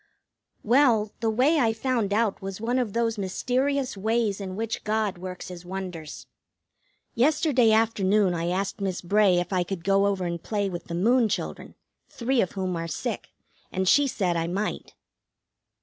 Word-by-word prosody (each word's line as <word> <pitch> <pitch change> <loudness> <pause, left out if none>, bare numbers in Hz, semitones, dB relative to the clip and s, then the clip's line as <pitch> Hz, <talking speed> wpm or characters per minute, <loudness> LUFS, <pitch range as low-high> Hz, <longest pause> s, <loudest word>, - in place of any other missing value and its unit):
Well, 230 -3 +3
the 225 - 0
way 265 +8 +3
I 225 -4 +3
found 230 -3 -1
out 215 -1 +1
was 195 0 -6
one 240 +3 0
of 230 -6 -2
those 230 -2 0
mysterious 260 +7 -1
ways 215 0 0
in 185 -1 -5
which 225 +2 -3
God 210 -3 -1
works 180 0 -7
his 180 -1 -9
wonders. 180 -4 -7 0.9
Yesterday 260 -2 +3
afternoon 210 -3 +3
I 170 0 -2
asked 195 +3 -2
Miss 190 -2 -2
Bray 200 0 +4
if 175 +2 -1
I 185 - +2
could 175 -1 -4
go 195 +1 +3
over 195 -2 -1
and 170 -1 -3
play 205 -3 -2
with 175 - -6
the 170 - -5
Moon 230 +5 +3
children, - - -4 0.3
three 255 0 0
of 185 - -2
whom 185 -2 -2
are 165 0 -3
sick, 155 - -4 0.4
and 190 0 -1
she 285 +8 +5
said 185 -8 -1
I 165 0 -1
might. 200 +5 -3
205 Hz, 170 wpm, -26 LUFS, 185-230 Hz, 0.9 s, she